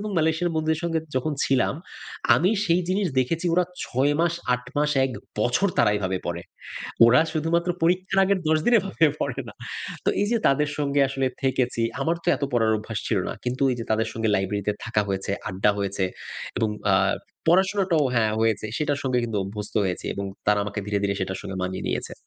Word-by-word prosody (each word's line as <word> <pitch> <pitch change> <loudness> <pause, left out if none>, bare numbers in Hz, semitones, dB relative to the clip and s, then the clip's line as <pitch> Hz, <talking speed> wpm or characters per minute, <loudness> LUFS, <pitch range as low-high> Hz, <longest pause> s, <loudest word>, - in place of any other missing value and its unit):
এবং 210 0 -4
মালয়েশিয়ান 160 +2 +1
বন্ধুদের 155 0 0
সঙ্গে 165 -1 +1 0.2
যখন 150 +4 0
ছিলাম 135 -1 +2 0.6
আমি 180 +4 +3
সেই 175 -1 +3
জিনিস 195 +2 +1
দেখেছি 165 +7 -1
ওরা 180 +1 +3 0.2
৬ 135 +4 +1
মাস, 170 0 +2 0.2
৮ 125 0 -6
মাস, 150 0 +2
১ 130 - -1 0.3
বছর 120 - +2
তারা - - +5
এভাবে 95 -2 -1
পড়ে। 85 0 -3 0.6
ওরা 120 +2 +6
শুধুমাত্র 170 +2 +1
পরীক্ষার 185 +3 +2
আগের 195 0 +2
১০ 155 0 +4
দিন 240 - +5
এভাবে 190 -4 +2
পড়ে - - -2
না। - - -10 0.5
তো - - +2
এইযে 230 +3 +1
তাদের 145 +2 +3
সঙ্গে 140 -1 +1
আসলে 135 -1 -1 0.2
থেকেছি 125 -3 0 0.2
আমার 165 +1 +1
তো - - -1
এত - - -14
পড়ার 115 -2 +3
অভ্যাস 110 0 -5
ছিল 105 - +2
না। - - -2
কিন্তু 125 +3 -2
এইযে 120 -2 -4
তাদের 110 +1 +1
সঙ্গে 110 -1 -1
লাইব্রেরিতে 100 +2 -1
থাকা 110 -2 +1
হয়েছে, 95 +1 -2 0.2
আড্ডা 95 +3 +2
হয়েছে 100 -1 -1 0.5
এবং 110 - +1 0.2
আ - - +6 0.5
পড়াশোনাটাও 185 -3 +3
হ্যাঁ 110 -2 +2
হয়েছে। 110 -1 +1
সেটার 145 -2 0
সঙ্গে 130 -2 +1
কিন্তু 110 -3 -2
অভ্যস্ত 105 +2 -7
হয়েছি 90 -2 -3
এবং 100 - -3 0.2
তারা 105 0 +4
আমাকে 105 +1 -5
ধীরে, 105 0 0
ধীরে 100 0 +1
সেটার 95 0 -2
সঙ্গে 95 - -6
মানিয়ে 95 0 -3
নিয়েছে। - - -3
130 Hz, 190 wpm, -25 LUFS, 105-165 Hz, 0.6 s, ওরা